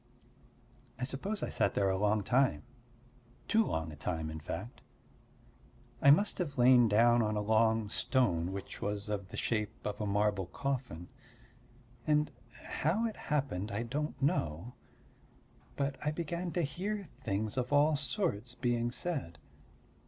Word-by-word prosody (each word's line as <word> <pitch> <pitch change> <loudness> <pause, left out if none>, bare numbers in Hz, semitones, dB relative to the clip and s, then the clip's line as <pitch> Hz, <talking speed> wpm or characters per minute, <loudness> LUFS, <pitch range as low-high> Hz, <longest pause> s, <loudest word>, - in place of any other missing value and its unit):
I - - -5
suppose 190 +11 -3
I - - -1
sat - - +1
there 100 -1 +2
a - - +1
long 105 0 +2
time 125 - +2 0.8
too 225 0 +4
long 80 - -2
a - - -8
time, 80 +1 -3
in 80 - -6
fact; 110 - -6 1.2
I 140 - +6
must 200 +10 +5
have 150 -6 -3
lain 125 -1 +7
down 120 +3 +5
on 105 -1 0
a - - 0
long 110 +1 +3
stone 95 -7 +1
which 100 0 -7
was 105 0 -2
of 100 -2 -3
the - - -8
shape 110 -3 -2
of 105 +1 -3
a 105 - -1
marble 100 -2 +1
coffin. 125 - -4 1.0
And 150 0 +3 0.4
how 185 +10 +1
it 225 - -2
happened 130 -9 -1
I 105 +3 -2
don't 145 +6 -3
know, 100 - -1 1.0
but 140 -1 -1
I 150 - +1
began 170 +3 -3
to 175 - +1
hear 195 +6 -3
things 105 -1 -2
of 125 0 -2
all 145 +2 +5
sorts 130 - -2
being 120 -2 0
said. 125 - -3
120 Hz, 150 wpm, -32 LUFS, 100-145 Hz, 1.2 s, lain